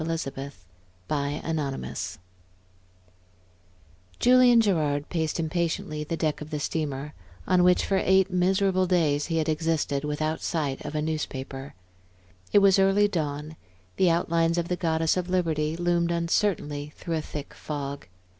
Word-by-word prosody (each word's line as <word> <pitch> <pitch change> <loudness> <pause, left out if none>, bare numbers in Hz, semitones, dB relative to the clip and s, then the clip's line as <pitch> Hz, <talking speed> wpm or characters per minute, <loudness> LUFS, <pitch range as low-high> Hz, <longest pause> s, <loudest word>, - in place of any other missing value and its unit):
Chapter 140 -4 -3 0.6
XXXVII 145 0 -3 2.0
Julian 250 -1 +6
Gerard 155 -9 +1
paced 160 -1 -1
impatiently 160 -2 -2
the 165 +2 -3
deck 155 -2 -1
of 150 - -7
the 150 -2 -3
steamer 150 -1 -3 0.3
on 180 -1 +4
which, 180 0 +4
for 195 -1 +1
eight 190 0 +3
miserable 185 +1 +2
days, 155 -5 +2
he 165 -1 -1
had 160 0 0
existed 155 -3 0
without 155 +2 -2
sight 145 -5 -2
of 150 0 -6
a 150 - 0
newspaper. 140 -4 -4 0.8
It 205 - +5
was 195 0 +5
early 195 +2 +4
dawn; 155 -4 -3 0.4
the 185 - +4
outlines 165 0 +1
of 170 0 -1
the 180 - +1
Goddess 165 -1 +1
of 180 0 -2
Liberty 160 -4 0
loomed 175 -1 +1
uncertainly 165 -4 -1
through 165 -1 -3
a - - -1
thick 150 -1 -7
fog. 140 -2 -6
160 Hz, 135 wpm, -26 LUFS, 150-180 Hz, 2.0 s, Julian